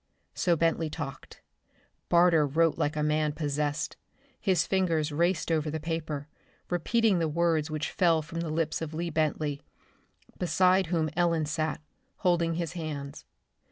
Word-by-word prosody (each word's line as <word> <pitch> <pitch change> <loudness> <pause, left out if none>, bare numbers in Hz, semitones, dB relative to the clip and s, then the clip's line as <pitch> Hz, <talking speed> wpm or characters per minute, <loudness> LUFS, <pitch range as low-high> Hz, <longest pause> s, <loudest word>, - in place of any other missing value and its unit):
So 175 -2 +2
Bentley 165 0 +1
talked. 145 -3 -7 0.7
Barter 170 -3 +5
wrote 160 +3 +2
like 145 - -1
a 150 - 0
man 150 0 +1
possessed. 150 0 -2 0.4
His 185 -6 +2
fingers 165 -5 +1
raced 170 +2 +1
over 155 -1 +1
the 160 +1 -3
paper, 155 -2 -4 0.4
repeating 200 +3 +2
the 165 - +1
words 160 -1 +1
which 155 -1 -3
fell 165 -4 +3
from 165 +2 -6
the 165 -1 -3
lips 160 +1 -1
of 160 -1 -5
Lee 170 +1 -2
Bentley, 150 -2 -1 0.8
beside 185 +1 +3
whom 160 -2 0
Ellen 170 -2 +2
sat, 155 0 -2 0.3
holding 170 -2 +1
his 170 -1 -3
hands. 150 -5 -6
160 Hz, 145 wpm, -28 LUFS, 150-170 Hz, 0.8 s, Barter